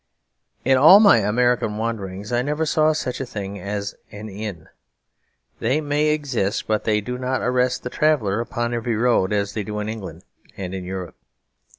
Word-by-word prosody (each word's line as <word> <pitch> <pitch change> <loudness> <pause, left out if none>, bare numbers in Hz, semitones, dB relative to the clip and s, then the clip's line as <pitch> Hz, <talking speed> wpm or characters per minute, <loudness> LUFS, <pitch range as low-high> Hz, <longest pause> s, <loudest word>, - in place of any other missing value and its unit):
In 130 0 +4
all 165 +8 +9
my 205 - +7
American 110 0 +1
wanderings 105 -3 -4
I 120 0 +2
never 150 +4 -1
saw 155 0 +3
such 130 -5 -3
a - - -2
thing 100 -3 -6
as 100 +1 -4 0.2
an 105 +1 -8
inn. 100 -5 -7 0.9
They 130 +6 +1
may 150 0 0
exist; 135 -9 -1
but 110 -1 -1
they 105 -1 +2
do 125 +4 -5
not 130 +1 -1
arrest 125 0 +1
the 125 - -5
traveller 125 -10 +1
upon 120 0 -2
every 115 -1 -1
road 115 -4 +2
as 100 -1 -1
they 110 - -2
do 105 +1 -5
in 105 - -3
England 95 -7 -7 0.3
and 95 -1 -5
in 95 -1 -5
Europe. 95 -2 -6
115 Hz, 180 wpm, -22 LUFS, 100-125 Hz, 0.9 s, all